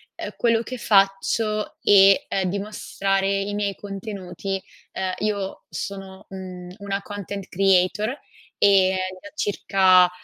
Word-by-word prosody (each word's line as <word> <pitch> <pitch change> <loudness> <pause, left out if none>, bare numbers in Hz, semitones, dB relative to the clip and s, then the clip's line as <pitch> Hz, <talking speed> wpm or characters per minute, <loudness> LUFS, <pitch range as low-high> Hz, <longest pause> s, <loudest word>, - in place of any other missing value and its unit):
ehm, - - -6
quello 230 -1 +2
che 255 +2 -6
faccio, 210 +1 +1
e, 195 -1 +6
ehm, 190 -2 -1
di 200 +2 -2
mostrare 195 -1 -1
i 200 +1 -1
miei 205 -1 -1
contenuti. 195 -2 -5 0.3
Uhm, 185 -1 -2
io 205 -2 -2
sono, 195 -1 -7
mhmm, 180 -2 -8
una 200 0 -3
content 200 -1 -7
creator 195 +4 +2 0.4
e 190 -2 +4 0.2
da 205 - -10
circa, 190 -5 +4
195 Hz, 125 wpm, -23 LUFS, 190-205 Hz, 0.4 s, e